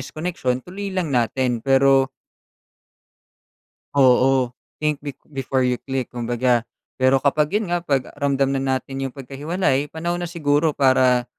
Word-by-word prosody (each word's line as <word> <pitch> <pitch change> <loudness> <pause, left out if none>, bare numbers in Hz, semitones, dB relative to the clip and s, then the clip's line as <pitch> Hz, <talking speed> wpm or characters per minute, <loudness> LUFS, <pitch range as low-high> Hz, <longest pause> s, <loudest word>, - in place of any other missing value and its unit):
is 130 - -7
koneksiyon, 155 -7 -3
tuloy 200 +3 -6
lang 185 -6 -2
natin, 120 0 0
pero 135 +1 +4 1.9
Oo, 130 -1 +4 0.2
think 150 -2 -1
be 145 -1 -7 0.2
before 130 -1 -1
you 125 -1 0
click 135 -2 -4
kumbaga, 120 0 +1 0.4
pero 130 +1 +5
kapag 150 +6 +2
'yun 200 -5 -2
nga, 175 - +1
'pag 140 -6 -1
ramdam 140 -1 +1
na 135 - 0 0.2
natin 135 +1 -6
'yung 135 -2 -4
pagkahiwalay, 140 +2 -1
panahon 170 +3 -3
na 175 - -3
siguro 150 -2 +1
para, 130 -2 +4
135 Hz, 140 wpm, -22 LUFS, 130-155 Hz, 1.9 s, pero